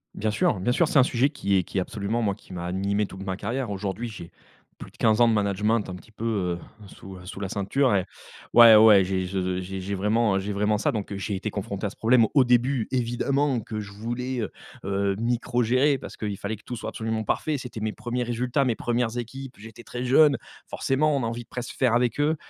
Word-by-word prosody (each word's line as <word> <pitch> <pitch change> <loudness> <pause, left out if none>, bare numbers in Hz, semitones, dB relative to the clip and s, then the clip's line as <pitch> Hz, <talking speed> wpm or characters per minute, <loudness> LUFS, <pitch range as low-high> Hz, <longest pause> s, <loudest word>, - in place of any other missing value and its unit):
Bien 110 - -1
sûr, 105 -1 +1
bien 110 +7 0
sûr. 170 +5 +3
C'est 140 - +4
un - - +7
sujet 130 +2 +2
qui 100 -9 -1
est 90 - +2
qui 95 - -6
est - - +3
absolument 110 +2 -2
moi, 100 -3 0
qui 100 - -19
m'a 85 -1 -5
animé 100 +3 0
toute 95 0 -9
ma 95 -1 -3
carrière. 125 +3 -3
Aujourd'hui, 100 +4 -4
j'ai 90 -6 -9 0.5
plus - - -10
de - - -23
15 110 +1 +3
ans 120 - +7
de 115 - +3
management 105 +1 +1
un 90 - -5
petit 90 +4 -14
peu, 110 +1 -7
heu, 90 -6 -1 0.3
sous, 95 0 -11
heu, 90 - -13
sous 95 - -7
la 100 -1 -4
ceinture 105 +6 +1
et 95 - +2 0.5
ouais, 115 -2 +10
ouais, 105 -2 +8
j'ai 95 0 -1
je 95 -1 -2
j'ai 95 +1 -6
j'ai 100 +2 -3
vraiment, 105 +2 +1
heu, - - +2
j'ai 100 +2 -4
vraiment 105 +1 +1
ça, - - +1
donc 105 -2 -4
j'ai 100 +1 -3
été 95 +3 -3
confronté 100 0 -4
à - - 0
ce - - -15
problème. 115 +1 +4
Au 140 -2 +6
début, 125 0 +2
évidemment, 130 +2 0
que 110 0 -5
je 100 -1 -7
voulais, 120 +4 -4
heu 110 - -4 0.3
heu, 100 0 0
microgérer, 125 +4 +1
parce - - -10
qu'il 105 -2 -3
fallait 100 +3 -4
que 105 - -22
tout 125 - -5
soit 110 - -5
absolument 110 0 -3
parfait. 150 +7 -1
C'était 125 -3 -7
mes 110 0 -2
1ers 120 0 -3
résultats, 125 +3 0
mes 120 -3 +1
1res 120 0 -1
équipes, 130 +2 -6
j'étais 115 +2 -12
très 120 +3 -6
jeune. 140 +3 +5 0.3
Forcément, 145 +3 +1
on 135 - -1
a - - 0
envie 115 +1 -4
de - - -31
presque 125 -2 -6
faire 125 -4 +2
avec 120 +1 +1
eux. 150 +2 +2
110 Hz, 245 wpm, -25 LUFS, 100-125 Hz, 0.5 s, ouais